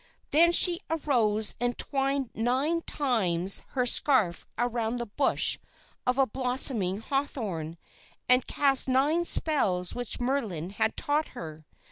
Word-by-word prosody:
Then 335 +3 +4
she 345 0 +3
arose 235 -9 0
and 245 0 -2
twined 275 -2 -2
nine 265 +9 0
times 195 - -1
her 250 -2 0
scarf 235 - +3
around 240 -1 -2
the 240 - -4
bush 255 +6 +2 0.5
of 250 +1 +1 0.2
blossoming 245 -7 +1
hawthorn, 210 - -4 0.5
and 250 +1 +3
cast 275 -2 +3
nine 290 +7 +1
spells 190 - +2
which 245 -2 -5
Merlin 225 - -3
had 220 +2 -2
taught 300 +2 -1
her. 155 -1 -10
245 Hz, 120 wpm, -27 LUFS, 210-280 Hz, 0.5 s, Then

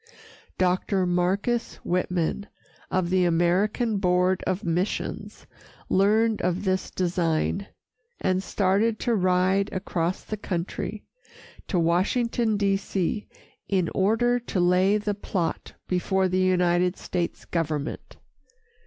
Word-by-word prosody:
Dr. 185 +1 +1
Marcus 190 +7 0
Whitman, 180 +2 -1 0.4
of 180 -1 0
the 185 -1 +3
American 185 +7 +2
Board 180 -1 +2
of 185 +3 -1
Missions, 175 +3 -3 0.4
learned 215 +3 +3
of 180 +2 -1
this 190 -1 0
design, 175 +2 0 0.5
and 185 0 +1
started 205 +4 +1
to 240 - +1
ride 185 0 +2
across 180 -1 -2
the 215 - -5
country 195 +2 -4 0.6
to 190 - 0
Washington, 210 +6 +1
D. 200 -1 +2
C., 195 +1 -2 0.4
in 185 -4 +1
order 225 +5 +2
to 230 -5 -3
lay 180 +3 +4
the 210 0 -2
plot 185 -4 -3
before 190 +1 +1
the 185 0 0
United 180 0 +2
States 175 -2 -3
government. 155 -3 -3
185 Hz, 110 wpm, -25 LUFS, 180-205 Hz, 0.6 s, lay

